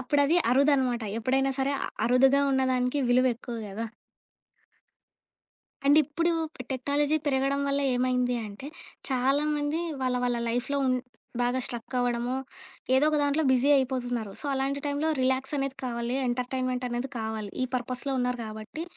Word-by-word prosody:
అప్పుడు 275 +3 +1
అది 330 +5 +3
అరుదు 280 +4 +4
అనమాట 250 -3 0 0.2
ఎప్పుడైనా 265 +4 +1
సరే 270 +1 +1 0.3
అరుదుగా 265 +3 +5
ఉన్నదానికి 260 0 +1
విలువ 250 +1 +4
ఎక్కువ 240 0 -7
గదా? 210 +4 -4 2.0
అండ్ 290 +2 +6
ఇప్పుడూ 335 +5 0 0.4
టెక్నాలజీ 285 +3 +1
పెరగడం 275 0 +1
వల్ల 280 0 +1
ఏమైంది 250 0 +1
అంటే, 205 +6 -9 0.4
చాలామంది 290 +4 +1 0.2
వాళ్ళ 255 -1 +1
వాళ్ళ 245 -1 +1
లైఫ్‌లో 245 +4 -1 0.6
బాగా 245 +1 +1
లైఫ్‌లో 240 - -4 0.2
అవ్వడము, 245 +1 0 0.6
ఏదో 265 +3 +4
ఒక 305 - +1
దాంట్లో 285 +2 +2
బిజీ 260 +2 +3
అయిపోతున్నారు. 245 -4 -1
సో, - - -10
అలాంటి 270 +1 -1
టైంలో 285 +2 0
రిలాక్స్ 260 +2 0
అనేది 275 -1 -2
కావాలి 235 0 -2
ఎంటర్టైన్మెంట్ 250 +1 -1
అనేది 245 +2 -3
కావాలి, 220 -2 -4
ఈ - - +1
పర్‌పస్స్‌లో 255 +2 -2
ఉన్నారు 250 0 -1
గాబట్టి. 215 +8 -7
260 Hz, 135 wpm, -27 LUFS, 245-280 Hz, 2.0 s, అండ్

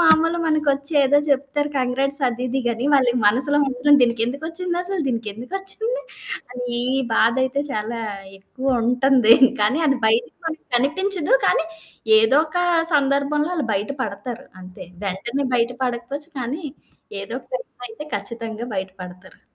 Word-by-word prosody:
మామూలు 330 +1 +4
మనకొచ్చి 300 -2 0
ఏదో 280 +2 +4
జెప్తారు 285 +1 0
కంగ్రాట్స్ 270 +3 +2
అది 245 +1 -5
ఇది 265 +2 -1
గాని, 235 +2 -1
వాళ్ళ 265 -3 +4 0.2
మనసులో 260 +7 +4
మాత్రం 275 +3 +3
దీనికెందుకొచ్చిందసలు 325 - -1
దీనికెందుకొచ్చింది? 385 - -4 0.5
అనీ 245 -1 -3 0.3
బాధయితే, 260 +5 +2
చాలా 220 +2 -3 0.4
ఎక్కువ 260 +7 -8 0.2
ఉంటంది. 250 -2 +5 0.3
కానీ, 255 +10 +2
అది 275 -1 +1
బయటకి 230 +2 +1
మనకి 320 -1 -5
కనిపించదు. 365 - +1
కానీ 325 - +2 0.5
ఏదొక 300 +9 +2 0.4
సందర్భంలో 285 +3 +1
ఆళ్ళు 290 -6 -1
బయట 205 +6 -2
పడతారంతే. 200 -5 -8 0.2
వెంటనే 235 +9 -3
బయట 235 0 +2
పడకపోచ్చు 255 +6 -4
కానీ, 275 +8 -4 0.6
ఏదోక 235 +6 -7
టైంలో - - -7
అయితే 230 +7 -9
ఖచ్చితంగా 225 +2 -6
బయట 190 0 -3
పడతారు. 180 +1 -13
265 Hz, 120 wpm, -21 LUFS, 235-300 Hz, 0.6 s, ఉంటంది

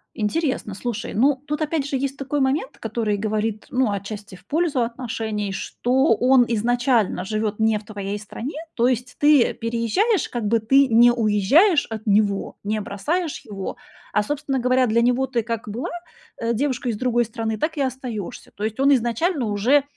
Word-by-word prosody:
Интересно, 230 - -1
слушай. 225 +2 -4
Ну, 265 +4 +2
тут 300 +1 -2
опять 300 -2 -1
же 275 - -2
есть 275 +1 -2
такой 280 +1 -2
момент, 275 - 0
который 220 -2 -1
говорит, 215 0 -2
ну, 255 -4 +1
отчасти 200 0 -6
в 180 - -18
пользу 310 -5 +1
отношений, 225 -4 -3
что 250 +5 +1
он 250 +1 +4
изначально 235 -3 +1
живёт 215 +1 -2
не 220 -1 +3
в 210 - -9
твоей 205 -1 -4
стране. 230 +6 -6 0.2
То 240 +1 +2
есть 250 0 -1
ты 290 -4 +5
переезжаешь, 235 - 0
как 240 -2 -3
бы 230 +1 +3
ты 270 +5 +4
не 240 +1 +6
уезжаешь 240 - +4
от 220 -1 -6
него, 200 -1 +1
не 215 +1 -1
бросаешь 300 - -2
его, 195 -3 -5 0.4
а, 210 - +3
собственно 275 +1 -2
говоря, 255 +1 +3
для 230 +2 +3
него 250 +2 +2
ты 235 -3 -1
как 230 -2 -4
была, 235 +6 -4 0.5
э, 230 0 0
девушкой 255 -1 -1
из - - -5
другой 240 -1 +1
страны, 220 -1 -3
так 315 0 -1
и - - 0
остаёшься. 250 -6 -4
То 205 - -6
есть 220 +3 -3
он 280 +1 +4
изначально 245 - 0
уже, 230 +8 +3
235 Hz, 175 wpm, -22 LUFS, 215-265 Hz, 0.5 s, не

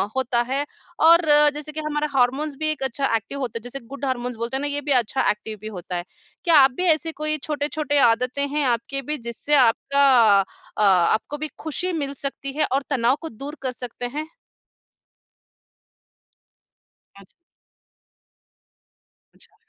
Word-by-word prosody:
होता 245 -2 +1
है 280 +2 0 0.4
और 335 +1 +7 0.3
जैसे 300 +1 -7
कि 310 - -5
हमारा 300 0 -1
हार्मोन्स 275 +4 +1
भी 310 0 0
एक 285 -3 -4
अच्छा 265 -2 0
एक्टिव 225 +6 -4
होता 235 -4 -3
है - - -7
जैसे 245 +3 -7
गुड 280 +1 -6
हॉर्मोन्स 250 -2 -2
बोलते 235 +4 -3
हैं - - -4
ना 290 - -1
ये 290 0 -3
भी 285 0 -4
अच्छा 250 +4 -1
एक्टिव 215 +1 -7
भी 215 - -7
होता 180 -1 -6
है। 175 - -2 0.4
क्या 335 -2 +4
आप 265 -1 +6
भी 365 - -1
ऐसे 325 +1 -4
कोई 305 0 -1
छोटे-छोटे 295 -1 -1
आदतें 250 +5 0
हैं 295 -1 0
आपकी 245 +3 -1
भी 300 +3 -3
जिससे 235 +5 -1
आपका 280 +2 +3 0.7
अ, - - 0
आपको 195 +9 +2
भी - - -1
खुशी 355 +4 -2
मिल 280 0 -3
सकती 275 0 -4
है - - +3
और 275 +1 +2
तनाव 255 -1 +2
को 325 - -6
दूर 280 +7 -8
कर 260 -1 -2
सकते 245 -1 -7
हैं? 310 +1 -3 2.9
अच् 190 - -20 2.0
अच्छा। - - -20
275 Hz, 165 wpm, -23 LUFS, 240-295 Hz, 2.9 s, और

